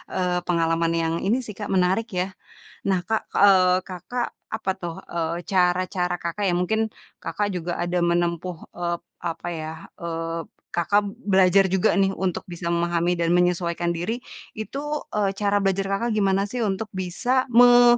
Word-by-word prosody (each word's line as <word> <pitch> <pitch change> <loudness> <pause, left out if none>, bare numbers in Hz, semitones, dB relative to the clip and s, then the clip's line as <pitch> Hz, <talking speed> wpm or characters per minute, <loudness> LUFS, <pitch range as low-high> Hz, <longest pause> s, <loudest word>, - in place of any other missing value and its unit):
eee, 180 -1 0
pengalaman 165 -1 +2
yang 165 0 0
ini 220 +6 +2
sih, 215 - -7
Kak, 205 +1 -6
menarik 190 +4 +2
ya. 185 0 -2 0.5
Nah, 190 -2 +2
Kak, 220 +4 -1
eee, 185 -2 +6
Kakak, 190 +7 -4 0.3
apa 220 -3 -1
tuh, 170 -2 -5 0.2
eee, 165 -1 -1 0.2
cara-cara 180 -1 +2
Kakak 170 +4 -3
ya 180 - +2
mungkin, 180 +5 +1 0.4
Kakak 205 -1 -2
juga 175 -2 -3
ada 175 +1 0
menempuh, 170 0 0 0.2
eee, 175 0 -1 0.3
apa 170 0 -3
ya, 160 -2 -4 0.3
eee, 165 -1 -3 0.3
Kakak 200 +4 +2 0.2
belajar 190 -1 +4
juga 190 +3 +3
nih 195 -1 +3
untuk 190 -2 -2
bisa 175 0 -6
memahami 170 0 +1
dan 170 -1 0
menyesuaikan 175 -1 +1
diri, 180 +8 -2 0.4
itu, 220 +5 -5 0.4
eee, 205 -2 +2
cara 205 -1 +2
belajar 195 0 +1
Kakak 230 +5 0
gimana 195 -2 +2
sih 250 - -3
untuk 195 +2 -1
bisa 240 +8 0
me 245 0 +7
180 Hz, 155 wpm, -24 LUFS, 170-200 Hz, 0.5 s, me